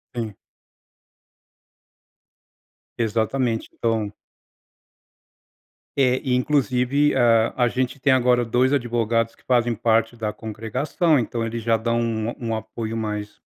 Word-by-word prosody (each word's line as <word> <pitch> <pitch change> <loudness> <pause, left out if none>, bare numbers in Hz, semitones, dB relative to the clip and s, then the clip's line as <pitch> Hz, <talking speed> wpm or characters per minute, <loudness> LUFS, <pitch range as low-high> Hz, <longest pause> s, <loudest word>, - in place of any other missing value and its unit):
Sim. 110 -4 -4 2.6
Exatamente, 115 +1 0
então. 110 -3 -1 1.8
Eh, 130 -2 +2
inclusive 130 +1 +2
a 115 -2 +4
a - - +3
gente 130 +2 -2
tem 135 0 +3
agora 125 -1 +3
dois 125 +3 +2
advogados 115 -3 0
que - - -27
fazem 120 -2 +2
parte 115 +2 +1
da 110 -2 -3
congregação, 125 - -1
então 115 -1 -1
eles 115 0 -4
já 115 -1 +3
dão 115 +1 0
um 115 0 -2
um 115 -2 -2
apoio 110 0 -5
mais 105 -1 -4
115 Hz, 110 wpm, -23 LUFS, 115-125 Hz, 2.6 s, a